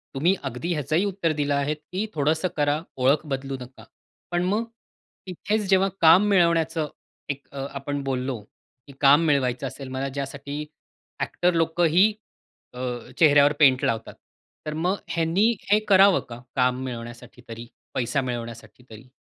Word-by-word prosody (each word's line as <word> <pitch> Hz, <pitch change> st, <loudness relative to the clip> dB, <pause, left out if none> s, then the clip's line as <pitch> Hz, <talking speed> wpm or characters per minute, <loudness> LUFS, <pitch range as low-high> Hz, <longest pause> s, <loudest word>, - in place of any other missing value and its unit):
तुम्ही 170 Hz, +8 st, +2 dB
अगदी 135 Hz, +6 st, -3 dB
ह्याचही 155 Hz, +5 st, 0 dB
उत्तर 190 Hz, -4 st, -1 dB
दिलं 145 Hz, -1 st, -1 dB
आहे, 140 Hz, +1 st, 0 dB
की 180 Hz, +7 st, -5 dB
थोडंसं 155 Hz, +4 st, +1 dB
करा, 145 Hz, +1 st, +1 dB, 0.2 s
ओळख 135 Hz, +4 st, +2 dB
बदलू 135 Hz, -1 st, -3 dB
नका. 125 Hz, +1 st, -12 dB, 0.5 s
पण 175 Hz, 0 st, 0 dB
मग, 210 Hz, +5 st, 0 dB, 0.6 s
इथेच 205 Hz, +3 st, -2 dB
जेव्हा 195 Hz, 0 st, +4 dB
काम 170 Hz, +5 st, +7 dB
मिळवण्याचं 165 Hz, -4 st, +2 dB, 0.4 s
एक 140 Hz, 0 st, -5 dB
अ, 135 Hz, -1 st, -5 dB
आपण 140 Hz, +1 st, -4 dB
बोललो, 130 Hz, -2 st, -2 dB, 0.5 s
की 140 Hz, -, -12 dB
काम 145 Hz, +2 st, +6 dB
मिळवायचं 135 Hz, -3 st, +1 dB
असेल 135 Hz, +1 st, -8 dB
मला 135 Hz, +1 st, -3 dB
ज्यासाठी 140 Hz, +2 st, -5 dB, 0.5 s
ॲक्टर 180 Hz, 0 st, 0 dB
लोकं 165 Hz, +1 st, +1 dB
ही 200 Hz, +4 st, +6 dB, 0.6 s
अ, -, -, -12 dB, 0.4 s
चेहऱ्यावर 145 Hz, -2 st, +6 dB
पेंट 135 Hz, -4 st, +5 dB
लावतात, 115 Hz, -1 st, -2 dB, 0.5 s
तर 150 Hz, -, -3 dB
मग 175 Hz, +5 st, 0 dB
ह्यांनी 170 Hz, +7 st, +2 dB, 0.2 s
हे 210 Hz, -, +6 dB
करावं 195 Hz, -1 st, +6 dB
का, 120 Hz, 0 st, -9 dB
काम 125 Hz, 0 st, +1 dB
मिळवण्यासाठी 120 Hz, 0 st, -8 dB
तरी, 115 Hz, +1 st, -8 dB, 0.3 s
पैसा 125 Hz, +3 st, 0 dB
मिळवण्यासाठी 120 Hz, -1 st, -7 dB
तरी? 110 Hz, +3 st, -13 dB
145 Hz, 145 wpm, -24 LUFS, 130-170 Hz, 0.6 s, काम